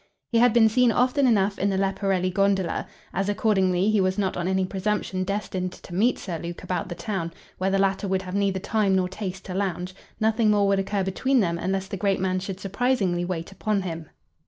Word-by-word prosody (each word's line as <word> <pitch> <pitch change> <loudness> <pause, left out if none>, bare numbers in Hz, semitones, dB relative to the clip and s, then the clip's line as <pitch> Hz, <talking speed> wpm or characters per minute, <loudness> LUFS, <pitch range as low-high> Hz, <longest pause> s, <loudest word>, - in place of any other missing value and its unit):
He 230 - +3
had 245 0 +6
been 225 -1 +6
seen 245 +2 +4
often 255 +3 +2
enough 200 -3 +2
in 200 - +2
the 195 - 0
Leporelli 195 -1 0
gondola. 195 -2 +1 0.3
As, 195 +2 -1
accordingly, 195 -2 +2
he 215 -2 +3
was 185 +1 +1
not 195 -2 0
on 175 0 -2
any 190 0 +1
presumption 190 -1 -2
destined 185 -2 -3
to 175 - -12
meet 220 +8 +2
Sir 170 -5 -5
Luke 170 +2 -7
about 180 0 -3
the 175 - -4
town, 180 -3 -3 0.3
where 190 +1 +1
the 195 - +2
latter 195 0 +1
would 190 0 0
have 185 -1 -7
neither 200 -1 +1
time 200 0 +1
nor 185 -1 +2
taste 185 0 -6
to 185 - -5
lounge, 185 -1 -2 0.3
nothing 220 0 +2
more 205 -1 +3
would 195 0 +3
occur 195 0 -1
between 260 +8 +1
them 170 -5 0
unless 190 +2 -1
the 195 - -5
great 195 -1 +1
man 185 0 0
should 190 0 -6
surprisingly 200 -3 0
wait 175 -1 -4
upon 200 0 -1
him. 165 -3 -5
195 Hz, 215 wpm, -25 LUFS, 185-205 Hz, 0.3 s, had